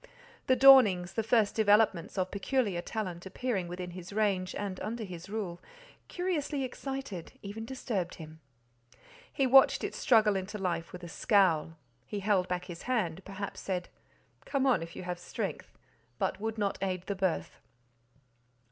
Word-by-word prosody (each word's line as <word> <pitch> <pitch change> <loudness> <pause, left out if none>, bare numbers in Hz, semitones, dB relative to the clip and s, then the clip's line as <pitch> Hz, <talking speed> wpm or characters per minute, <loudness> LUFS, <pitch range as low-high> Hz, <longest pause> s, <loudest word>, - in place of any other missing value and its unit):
The 260 - +5
dawnings, 230 -10 +7
the 225 - 0
first 220 -2 +2
developments 205 -5 +3
of 185 0 0
peculiar 200 -3 0
talent 185 -3 -5
appearing 200 -4 -2
within 180 0 -6
his 180 +1 -9
range, 200 -3 0
and 195 -2 -4
under 225 +1 -4
his 180 -2 -8
rule, 195 -5 -4 0.5
curiously 315 -6 -2
excited, 260 - -5
even 210 +3 -6
disturbed 220 -8 -3
him. 160 -1 -11 0.9
He 275 - +1
watched 265 +1 +6
its - - -4
struggle 215 -4 +4
into 195 +2 -3
life 175 -4 -2
with 180 -1 -9
a - - -6
scowl; 165 -4 +2 0.3
he 205 - -4
held 195 -2 +2
back 180 0 -2
his 175 -2 -8
hand—perhaps 195 -2 -2
said, 180 -2 -3 0.5
"Come 275 -2 0
on 260 -8 +3
if 165 0 -8
you - - -6
have 180 -1 -4
strength," 180 - -5 0.4
but - - -1
would 220 +1 -3
not 200 -2 -1
aid 185 -2 -2
the 200 - -2
birth. 190 -3 -2
200 Hz, 155 wpm, -30 LUFS, 180-225 Hz, 0.9 s, dawnings